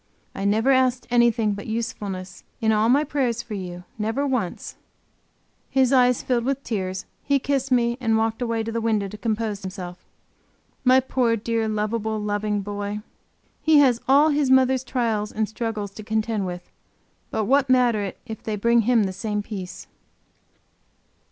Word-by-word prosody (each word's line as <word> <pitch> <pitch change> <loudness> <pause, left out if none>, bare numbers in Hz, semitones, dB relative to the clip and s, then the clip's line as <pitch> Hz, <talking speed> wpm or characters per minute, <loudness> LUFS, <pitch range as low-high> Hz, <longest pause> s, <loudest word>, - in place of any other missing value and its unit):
I 195 - -4
never 220 +6 +3
asked 255 -1 +2
anything 235 -3 +3
but 200 0 -7
usefulness, 200 -5 -4 0.2
in 220 -1 +2
all 215 +1 +3
my 280 +4 +4
prayers 255 -6 -1
for 220 - -8
you; 180 -3 -6 0.2
never 225 +7 -1
once." 250 -10 -2 0.9
His 265 -1 +3
eyes 250 -2 +4
filled 245 -2 0
with 275 +2 -1
tears; 190 -4 -3 0.2
he 280 0 +2
kissed 275 0 -1
me 240 0 +2
and 225 -2 +2
walked 225 +1 -1
away 230 -2 -1
to 225 - -4
the 230 0 -2
window 215 -3 +1
to 210 - -8
compose 220 -2 -2
himself. 185 -2 -7 0.8
My 260 0 +5
poor, 250 -3 +1
dear, 225 0 -1
lovable, 215 +1 -1
loving 210 0 -1
boy! 205 +1 -4 0.6
He 315 -1 +5
has 255 -5 +4
all 285 +4 +6
his 290 -2 +1
mother's 260 0 +4
trials 225 -5 -1
and 215 0 -1
struggles 215 -2 -4
to 215 - -10
contend 220 -2 -1
with; 180 0 -7 0.6
but 215 - -1
what 275 +3 +3
matter 245 -4 +4
it 195 -2 -5
if 220 -2 -7
they 215 - -3
bring 235 +3 +3
him 230 0 +3
the 190 -1 -2
same 210 +1 -3
peace? 190 -4 -7
225 Hz, 165 wpm, -24 LUFS, 210-250 Hz, 0.9 s, all